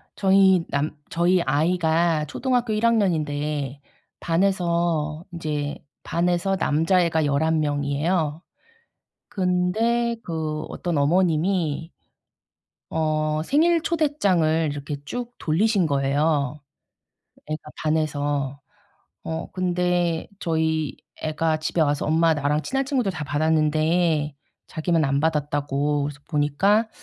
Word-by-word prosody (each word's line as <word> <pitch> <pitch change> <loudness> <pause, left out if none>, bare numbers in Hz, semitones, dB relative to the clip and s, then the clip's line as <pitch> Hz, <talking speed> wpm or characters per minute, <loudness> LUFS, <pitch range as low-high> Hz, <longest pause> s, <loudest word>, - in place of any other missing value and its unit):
저희 190 -2 +4
남 145 +2 -1
저희 175 +2 +2
아이가 160 +1 +1
초등학교 245 - -1
1 215 +2 0
학년인데 150 - 0 0.4
반에서 170 -3 0
인제 150 -4 -3 0.3
반에서 175 +3 0
남자애가 165 0 +2
11 155 +3 +1
명이에요. 150 +2 0 0.9
근데 215 +6 +1
그 155 -2 -3
어떤 175 -3 -3
어머님이 165 +1 +1 1.0
어 155 -1 0
생일 330 - +3
초대장을 190 - +1
이렇게 145 +1 -5
쭉 245 +10 -5
돌리신 190 +3 +2
거예요 140 0 0 0.9
애가 155 +1 -4 0.2
반에서. 145 -3 -1 0.6
어 160 0 -5
근데 180 -2 0
저희 160 -4 -1 0.2
애가 155 0 0
집에 155 +1 0
와서 145 -1 0
엄마 160 +1 +3
나랑 150 0 0
친한 270 - -1
친구들 255 -8 0
다 175 -3 -5
받았는데 155 +1 +1 0.3
자기만 165 0 0
안 140 0 +1
받았다고 145 -2 0
그래서 145 0 -6
보니까 175 +9 +2
160 Hz, 225 characters per minute, -24 LUFS, 150-180 Hz, 1.0 s, 저희